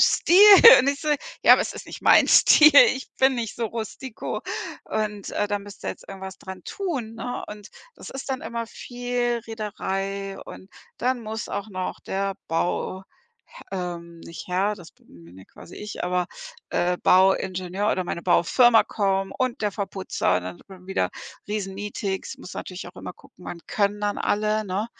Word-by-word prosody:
Stil.“ 345 - +4 0.4
Und 260 - 0
ich 280 0 -1
so: 305 - -4 0.4
„Ja, - - +9
aber - - +1
es - - -5
ist - - -10
nicht - - -10
mein - - +6
Stil, 305 0 +7 0.2
ich 260 0 -8
bin 265 0 +4
nicht 230 -3 -4
so 235 - -1
rustiko 230 +2 -6 0.5
und, 210 -2 -3
äh, 205 - -1
da 205 - -1
müsst 205 0 -13
ihr - - -1
jetzt - - -12
irgendwas 190 -1 -8
dran 190 -1 -9
tun“, 275 - -4
ne? 245 +2 -5
Und 210 0 -10 0.3
das - - -10
ist 270 +1 -7
dann 260 - -2
immer 230 0 -4
viel 245 0 -3
Rederei, 195 -3 -4
und 190 - -11 0.3
dann 250 -1 -1
muss 220 +1 -5
auch 200 - -4
noch 185 -1 -5
der 195 0 -3
Bauh 175 +3 -2 0.5
h - - -12
ähm, 170 -2 -6
nicht 165 - -10
Herr, 195 +4 0
das 175 -4 -14
bin 85 -1 -19
bin 85 +2 -16
ja 95 - -13
quasi 165 - -14
ich, 210 -3 -6
aber, 180 0 0 0.4
äh, 180 +1 0
Bauingenieur 190 +1 +2
oder 185 - -2
meine 170 - -5
Baufirma 225 +7 +4
kommen 195 -2 -1
und 255 -2 -2
der 210 - 0
Verputzer 195 -2 -1
und 90 - -3
dann 90 -1 -7
hat - - -23
man 185 -1 -14
wieder 95 - -1 0.4
Riesenmeetings. 200 -1 -4
Muss 180 - -10
natürlich 185 0 -7
auch 175 - -16
immer - - -7
gucken, - - -19
wann 175 - -6
können 205 0 0
dann 205 0 -1
alle, 215 +1 0
ne? 200 +2 -2
200 Hz, 180 wpm, -24 LUFS, 185-225 Hz, 0.5 s, Ja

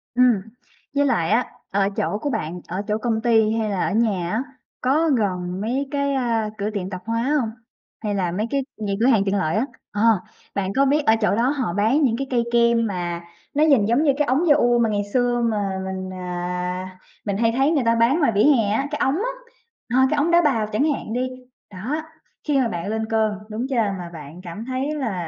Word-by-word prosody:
Ừm, 245 -5 +4 0.5
với 285 - +3
lại 200 -12 +1
á, 240 +3 +3 0.3
ở 195 0 +2
chỗ 205 +1 -2
của 290 - -1
bạn, 175 - -3
ở 185 +3 -3
chỗ 210 - +1
công 220 -1 -1
ty 225 -2 +3
hay 220 -1 0
là 195 -3 0
ở - - -1
nhà 200 -6 +1
á, 230 +5 0 0.4
có 305 +6 +2
gần 185 -7 -1
mấy 260 +6 -1
cái, 280 -1 0
a, 230 -4 0
cửa 205 +1 -1
tiệm 200 -3 -4
tạp 185 -2 -6
hóa 230 +1 -1 0.2
hông? 230 -4 -1 0.5
Hay 205 -1 -1
là 180 -3 0
mấy 210 +5 -2
cái 275 -1 0
những 200 -2 -2
cửa 235 - +2
hàng 220 -7 +4
tiện 195 0 +1
lợi 160 -4 0
á? 225 +5 +1 0.3
Ờ, 205 - -2 0.5
bạn 195 -1 -1
có 275 +1 +4
biết 295 +2 +2
ở 220 - +5
chỗ 210 - +2
đó 240 +3 +2
họ 260 -11 -1
bán 220 +10 +2
những 235 -4 +2
cái 275 0 -3
cây 240 -2 +2
kem 235 -1 +4
mà 175 -3 -3 0.3
nó 300 +2 +3
nhìn 275 -10 +5
giống 235 +7 +2
như 280 -3 +4
cái 295 - +2
ống 285 +7 +2
da-ua 240 -5 +4
mà 230 - +3
ngày 205 -1 0
xưa 245 -1 +2
mà 210 -3 0 0.2
mình, 190 0 -4
à, 180 +1 -4 0.3
mình 200 -2 -1
hay 230 0 +2
thấy 275 +4 +3
người 285 -6 +2
ta 230 0 +4
bán 235 +7 +3
ngoài 285 -8 +3
vỉa 205 - +4
hè 245 -8 +4
á, 270 +6 0
cái 295 - -3
ống 265 +3 +2
á, 480 +7 -1 0.7
ờ, 265 - +6
cái 300 - 0
ống 315 +4 +2
đá 345 - +6
bào 240 -9 +1
chẳng 215 +5 0
hạn 220 - -5
đi, 255 +1 -1 0.4
đó. 250 +12 -3 0.5
Khi 290 -2 +2
mà 250 - +2
bạn 175 -3 -4
lên 220 +1 -1
cơn, 220 -1 +2 0.2
đúng 225 +4 -3
chưa? 270 - -1
Mà 195 -6 -1
bạn 155 +2 -10
cảm 185 +6 -7
thấy 265 +4 -2
là, 195 - -3
225 Hz, 235 wpm, -22 LUFS, 195-265 Hz, 0.7 s, ờ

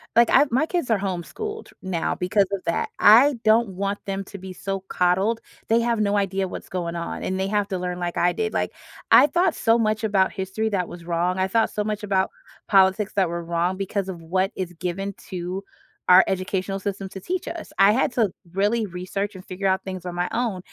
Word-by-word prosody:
like, 235 0 +6
I 290 - +6
my 265 +6 +2
kids 345 -8 -2
are 215 -3 +3
homeschooled 200 - -5
now 185 -3 -1
because 195 +2 +2
of 195 -2 -3
that. 170 - -1
I 250 +6 +7
don't 220 0 +4
want 200 +2 -3
them 195 0 -3
to 200 - -9
be 185 0 -8
so 195 +1 -4
coddled, 190 +6 +1 0.3
they 230 +1 +3
have 235 -1 0
no 205 -1 +2
idea 195 -1 0
what's - - -8
going 170 -2 -3
on, 170 - -4
and 190 0 -2
they 190 - 0
have 205 0 0
to 190 - -2
learn 180 0 -3
like 175 -1 -3
I 175 0 +3
did. 435 0 -2
Like, - - -1 0.4
I 290 - +8
thought 350 0 +1
so 230 +1 +3
much 215 -1 0
about 195 -3 +2
history 195 +3 -2
that 185 -4 -1
was 175 -1 -10
wrong. 175 +2 0
I 185 - +1
thought 225 +3 +2
so 210 - -1
much 210 0 -3
about 195 -2 +1 0.4
politics 195 +1 +3
that 190 -4 +2
were 170 0 -4
wrong 170 +2 -1
because 195 0 -2
of 170 -3 -6
what 185 +4 0
is 180 -2 -4
given 185 +4 -4 0.2
to 185 +2 -4 0.5
our 180 +1 +9
educational 190 +1 -2
system 195 -1 -4
to 190 0 -9
teach 365 - -3
us. 335 -2 -6
I 200 +2 +7
had 255 - +1
to 225 -5 +2 0.2
really 210 +4 +1
research 190 +2 -4
and 185 - -11
figure 195 +2 -3
out 190 +1 +1
things 185 -2 -6
on 180 - -4
my 175 0 0
own, 230 -6 -1
195 Hz, 220 wpm, -24 LUFS, 180-215 Hz, 0.5 s, our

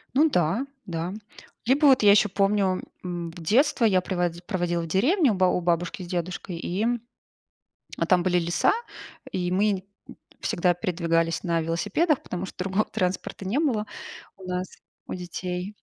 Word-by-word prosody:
Ну 310 +4 +5
да, 180 - +1 0.2
да. 170 +1 -3 0.5
Либо 280 +5 +4
вот 265 -2 +6
я 205 - +8
еще 210 +1 +5
помню, 195 -1 +1 0.2
м, 175 -2 -4
детство 235 - +2
я 200 -5 +5
приво 180 -1 -1 0.2
проводила 175 -4 0
в 165 - -5
деревне 260 - +3
у - - +1
ба 185 0 +3
у - - +1
бабушки 175 +1 -1
с - - -8
дедушкой. 175 +1 -4
И, 185 +5 -2 1.1
а, - - +1
там 180 -1 +4
были 180 0 +2
леса, 170 0 +2 0.6
и 180 -1 -2
мы, 195 0 +1 0.2
м, - - -11 0.2
всегда 175 +1 +2
передвигались 165 -1 0
на 170 -2 +1
велосипедах, 210 - +1
потому 180 +1 -4
что - - -11
другого 195 +3 +1
транспорта 185 +1 -3
не 215 +9 0
было 245 -9 +1 0.5
у 190 - -12
нас, 180 0 -2 0.4
у - - -6
детей. 180 +2 -5
185 Hz, 160 wpm, -26 LUFS, 175-210 Hz, 1.1 s, я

